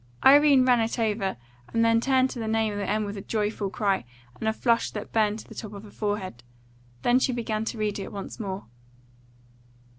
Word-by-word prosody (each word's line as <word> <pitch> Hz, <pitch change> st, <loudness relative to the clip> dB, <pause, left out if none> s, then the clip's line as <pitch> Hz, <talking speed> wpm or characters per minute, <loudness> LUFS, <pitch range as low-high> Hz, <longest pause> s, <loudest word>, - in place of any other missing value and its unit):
Irene 280 Hz, -1 st, +7 dB
ran 250 Hz, -2 st, +5 dB
it 225 Hz, +2 st, -1 dB
over, 210 Hz, -4 st, 0 dB, 0.3 s
and 230 Hz, 0 st, +2 dB
then 230 Hz, 0 st, +4 dB
turned 260 Hz, 0 st, +3 dB
to 245 Hz, -, -6 dB
the 225 Hz, -, -3 dB
name 220 Hz, -1 st, +1 dB
at -, -, -4 dB
the 200 Hz, -1 st, -2 dB
end 215 Hz, 0 st, +1 dB
with 205 Hz, 0 st, -5 dB
a -, -, -5 dB
joyful 210 Hz, -1 st, -2 dB
cry 200 Hz, -, 0 dB, 0.4 s
and 220 Hz, -, -2 dB
a -, -, +2 dB
flush 230 Hz, +1 st, +1 dB
that 210 Hz, -, -7 dB
burned 215 Hz, -1 st, +2 dB
to -, -, -11 dB
the -, -, -11 dB
top 215 Hz, -2 st, -7 dB
of 200 Hz, 0 st, -9 dB
her 210 Hz, -, -12 dB
forehead. 205 Hz, -, -3 dB, 0.6 s
Then 245 Hz, +1 st, +4 dB
she 260 Hz, -, +1 dB
began 225 Hz, -3 st, -2 dB
to 230 Hz, -, -4 dB
read 210 Hz, -1 st, -1 dB
it 195 Hz, -, -6 dB
once 200 Hz, +3 st, -7 dB
more. 195 Hz, -3 st, -4 dB
220 Hz, 215 wpm, -26 LUFS, 205-230 Hz, 0.6 s, Irene